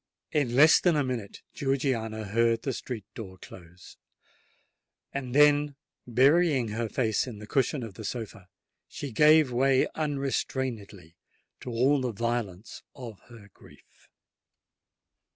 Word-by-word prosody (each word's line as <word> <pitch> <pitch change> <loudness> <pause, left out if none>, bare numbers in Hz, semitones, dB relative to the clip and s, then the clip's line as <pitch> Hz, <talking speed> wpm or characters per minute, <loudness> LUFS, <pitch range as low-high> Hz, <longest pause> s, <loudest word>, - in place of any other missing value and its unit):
In 135 -6 0
less 155 +4 +7
than 175 -3 +2
a 145 - +2
minute 120 -6 -5
Georgiana 130 -6 -1
heard 115 +3 +1
the 135 - -2
street 115 -4 -6
door 95 -6 -9
close; 90 0 -14 1.2
and 130 -2 -4
then, 145 0 +4 0.3
burying 135 +1 +3
her 115 +1 -3
face 110 -1 0
in 120 -4 -7
the 105 - -9
cushion 130 +4 0
of 110 -4 -8
the 110 - -10
sofa, 110 -3 -6 0.4
she 140 - -7
gave 150 +2 +5
way 130 +2 +3
unrestrainedly 130 - -3 0.4
to - - -8
all 130 +4 +2
the 125 -2 -2
violence 115 -3 -4
of 120 -7 -9
her 110 -4 -14
grief. - - -21
120 Hz, 130 wpm, -27 LUFS, 110-140 Hz, 1.2 s, less